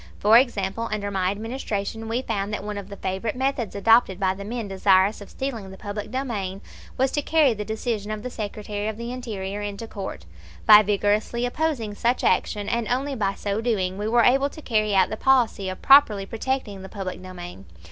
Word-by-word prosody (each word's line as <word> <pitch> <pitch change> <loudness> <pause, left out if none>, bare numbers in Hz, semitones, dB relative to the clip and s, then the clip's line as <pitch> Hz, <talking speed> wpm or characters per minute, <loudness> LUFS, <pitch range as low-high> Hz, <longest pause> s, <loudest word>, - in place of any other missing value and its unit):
For 215 +2 +5
example, 230 -3 +2
under 205 -1 -2
my 185 -2 +1
Administration 220 0 -4
we 235 +3 -1
found 205 -3 -2
that 210 - -3
one 210 -1 -4
of 200 0 -10
the 200 - -7
favorite 190 +5 -3
methods 260 -5 -1
adopted 200 -2 +4
by 190 -1 +2
the 200 +1 -8
men 225 +1 -4
desirous 195 +1 +3
of 200 - -10
stealing 235 -8 -5
the 190 - -11
public 205 0 -6
domain 210 -8 -3 0.4
was 265 +1 +2
to 295 - 0
carry 300 -4 +3
the 210 -1 -4
decision 220 -1 -3
of 215 0 -4
the 250 - -5
Secretary 210 -1 -4
of 220 -1 -3
the 235 +1 -5
Interior 210 -5 -5
into 205 +2 -5
court. 195 - -7 0.4
By 210 0 +10
vigorously 210 +3 0
opposing 245 -5 -1
such 240 +4 0
action, 205 -1 +1
and 235 0 -1
only 270 +3 -1
by 200 -6 -1
so 205 +2 -2
doing, 195 -5 -1
we 210 - -2
were 235 +1 +4
able 270 +4 +4
to 310 - -11
carry 215 -3 +1
out 190 -1 +4
the 215 - -3
policy 235 -7 +2
of 185 - -7
properly 250 -8 +6
protecting 225 -2 -3
the 190 - -9
public 185 -3 -6
domain. 175 - -9
210 Hz, 200 wpm, -24 LUFS, 200-240 Hz, 0.4 s, By